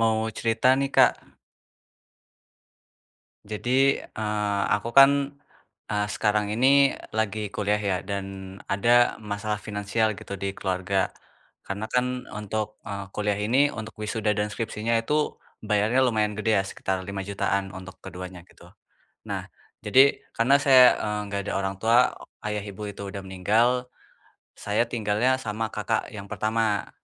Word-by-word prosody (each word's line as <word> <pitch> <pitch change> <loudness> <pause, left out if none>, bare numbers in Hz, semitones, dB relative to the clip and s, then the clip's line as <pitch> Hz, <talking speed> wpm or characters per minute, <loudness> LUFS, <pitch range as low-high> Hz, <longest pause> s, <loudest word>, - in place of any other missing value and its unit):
Mau 110 -1 +3 0.2
cerita 115 +2 +1
nih, 140 0 -1
Kak. - - +7 2.3
Jadi, 125 +6 +1
eee, 105 -2 -2
aku - - -2
kan, 135 0 +10 0.8
eee, 105 0 +1
sekarang 105 -1 +1
ini 135 +3 +4 0.2
lagi 110 -1 -2
kuliah 105 0 0
ya 100 -3 -1
dan 100 0 -4 0.5
ada 120 +5 +3
masalah 105 0 -3
finansial 105 +1 -1
gitu - - -10
di 100 0 -3
keluarga, 95 0 -1 0.5
karena 100 +2 -4
kan 125 0 0
untuk, 105 0 -4
eee, 100 -1 -4
kuliah 105 -1 -1
ini, 120 +8 +3
untuk 110 -4 -7
wisuda 105 0 0
dan 105 0 -1
skripsinya 115 +1 -2
itu, 150 +6 -1 0.2
bayarnya 105 +4 +2
lumayan 110 -3 +1
gede 110 0 +1
ya, 95 - +2
sekitar 95 -1 -3
lima 100 +1 -5
jutaan 100 -1 -1
untuk 95 0 -10
keduanya, 90 -1 -8
gitu. - - -18 0.6
Nah, - - -4 0.4
jadi 135 +2 +5 0.2
karena 135 +5 +4
saya, 135 -3 +7 0.2
eee, 105 0 -2
nggak 100 0 -1
ada - - -2
orang 95 0 -2
tua, 115 +4 +4
o - - -13 0.2
ayah, 105 -1 -2
ibu, 105 +1 -8
itu 100 0 -8
udah 100 0 -6
meninggal, 110 +7 +1 0.7
saya 105 +3 0
tinggalnya 115 +3 +1
sama 110 -3 -3
kakak 105 +1 -2
yang 100 -2 -7
pertama, 110 -1 0
105 Hz, 140 wpm, -25 LUFS, 100-115 Hz, 2.3 s, kan